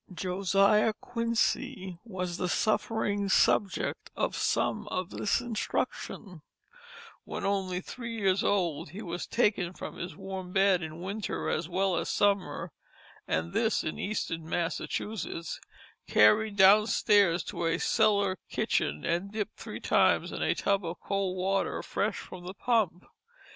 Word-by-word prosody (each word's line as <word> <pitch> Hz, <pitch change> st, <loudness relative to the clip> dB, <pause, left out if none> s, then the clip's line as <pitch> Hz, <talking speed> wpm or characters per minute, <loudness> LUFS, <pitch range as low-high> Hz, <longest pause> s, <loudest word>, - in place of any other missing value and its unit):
Josiah 195 Hz, +4 st, +2 dB
Quincy 230 Hz, -4 st, -1 dB
was 185 Hz, -5 st, -4 dB
the 180 Hz, -, -1 dB
suffering 205 Hz, -1 st, 0 dB
subject 195 Hz, 0 st, +2 dB
of -, -, -1 dB
some -, -, 0 dB
of 185 Hz, +1 st, -3 dB
this 205 Hz, -, +1 dB
instruction; 215 Hz, -5 st, -3 dB, 0.8 s
when -, -, -5 dB
only 190 Hz, -2 st, 0 dB
three 235 Hz, +2 st, -6 dB
years 195 Hz, -2 st, +2 dB
old 175 Hz, -8 st, 0 dB
he 195 Hz, +8 st, -8 dB
was 175 Hz, -2 st, -4 dB
taken 205 Hz, -6 st, +1 dB
from -, -, -8 dB
his 175 Hz, +1 st, -6 dB
warm 190 Hz, -2 st, -7 dB
bed 195 Hz, -2 st, +4 dB
in 160 Hz, +1 st, -7 dB
winter 200 Hz, +3 st, -3 dB
as 165 Hz, +1 st, -1 dB
well 190 Hz, +1 st, +1 dB
as -, -, -2 dB
summer 185 Hz, -5 st, +1 dB, 0.6 s
(and 80 Hz, +2 st, -1 dB
this 225 Hz, -1 st, +1 dB
in 155 Hz, -, -4 dB
Eastern 165 Hz, -6 st, -3 dB
Massachusetts), 170 Hz, 0 st, -3 dB, 0.5 s
carried 210 Hz, -, +4 dB
downstairs 200 Hz, -3 st, +5 dB
to 170 Hz, -, -3 dB
a 165 Hz, -, +1 dB
cellar 200 Hz, -3 st, +2 dB
kitchen 75 Hz, +1 st, 0 dB
and 175 Hz, +4 st, -1 dB
dipped 215 Hz, -1 st, -4 dB
three -, -, -7 dB
times -, -, +3 dB
in -, -, -5 dB
a -, -, +2 dB
tub 200 Hz, -1 st, +1 dB
of 170 Hz, +1 st, -5 dB
cold 195 Hz, -2 st, -2 dB
water 195 Hz, +1 st, 0 dB
fresh 205 Hz, 0 st, -1 dB
from 185 Hz, -1 st, -9 dB
the 185 Hz, -, -6 dB
pump. 210 Hz, -6 st, 0 dB
195 Hz, 140 wpm, -29 LUFS, 175-210 Hz, 0.8 s, downstairs